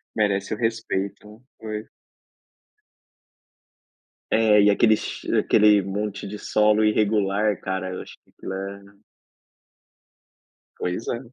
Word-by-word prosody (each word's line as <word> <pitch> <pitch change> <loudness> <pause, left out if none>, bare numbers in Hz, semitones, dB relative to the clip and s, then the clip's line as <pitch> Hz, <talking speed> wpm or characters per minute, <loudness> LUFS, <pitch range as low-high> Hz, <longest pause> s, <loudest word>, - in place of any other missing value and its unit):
Merece 100 -2 0
o - - -4
respeito, 110 -1 -3 0.2
pois. 110 0 -6 2.4
É, 110 -2 +5
e 100 - +5
aquele 110 +2 +4
che - - -5
aquele 105 -1 +4
monte 100 +1 -4
de 105 +1 -6
solo 105 +1 +2
irregular, 105 -1 +1
cara, 95 -1 -3
eu - - -5
acho - - -11
que - - -31
aquilo 95 - -7
é 100 +1 -8 1.8
Pois 90 +5 -3
é. 120 - -2
105 Hz, 110 wpm, -23 LUFS, 100-110 Hz, 2.4 s, É